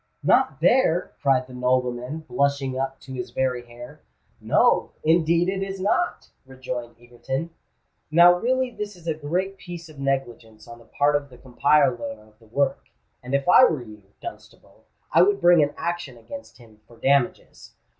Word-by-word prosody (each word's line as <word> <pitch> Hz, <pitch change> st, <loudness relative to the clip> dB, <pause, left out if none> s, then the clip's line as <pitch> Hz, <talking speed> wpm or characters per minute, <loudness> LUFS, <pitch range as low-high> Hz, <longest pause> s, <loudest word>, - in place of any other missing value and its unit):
"Not 135 Hz, -, +2 dB
there!" 180 Hz, -3 st, +3 dB
cried 135 Hz, -2 st, +2 dB
the 130 Hz, -, -14 dB
nobleman, 125 Hz, +3 st, -1 dB
blushing 140 Hz, -2 st, 0 dB
up 135 Hz, 0 st, -3 dB
to 130 Hz, -, -10 dB
his 125 Hz, -1 st, -5 dB
very 125 Hz, -1 st, -2 dB
hair. 120 Hz, +1 st, -12 dB, 0.4 s
"No—indeed 165 Hz, +2 st, +2 dB
it 190 Hz, 0 st, -2 dB
is 195 Hz, 0 st, -4 dB
not!" 280 Hz, -, -1 dB
rejoined 130 Hz, -2 st, -7 dB
Egerton. 130 Hz, +6 st, -5 dB, 0.6 s
"Now 170 Hz, +3 st, +7 dB
really 255 Hz, +7 st, 0 dB
this 210 Hz, -3 st, -6 dB
is 175 Hz, -2 st, -17 dB
a 160 Hz, -, +1 dB
great 180 Hz, +6 st, -3 dB
piece 170 Hz, -2 st, -9 dB
of 150 Hz, -3 st, -14 dB
negligence 120 Hz, -5 st, -4 dB
on 120 Hz, 0 st, -11 dB
the 115 Hz, -, -18 dB
part 145 Hz, +5 st, +1 dB
of 145 Hz, -1 st, -2 dB
the 125 Hz, -, -15 dB
compiler 140 Hz, +6 st, +1 dB
of 105 Hz, 0 st, -22 dB
the 115 Hz, -, -21 dB
work; 140 Hz, +5 st, -1 dB, 0.4 s
and 125 Hz, +2 st, -3 dB
if 140 Hz, +3 st, -1 dB
I 180 Hz, -, +7 dB
were 150 Hz, -, -1 dB
you, 105 Hz, -2 st, -13 dB, 0.2 s
Dunstable, -, -, -12 dB, 0.3 s
I 165 Hz, -, +5 dB
would 200 Hz, +2 st, +3 dB
bring 175 Hz, -1 st, +6 dB
an 145 Hz, 0 st, 0 dB
action 170 Hz, -7 st, -4 dB
against 280 Hz, -, -11 dB
him 110 Hz, -3 st, -19 dB
for 120 Hz, -, -18 dB
damages. 135 Hz, +1 st, -1 dB
140 Hz, 165 wpm, -24 LUFS, 125-170 Hz, 0.6 s, Now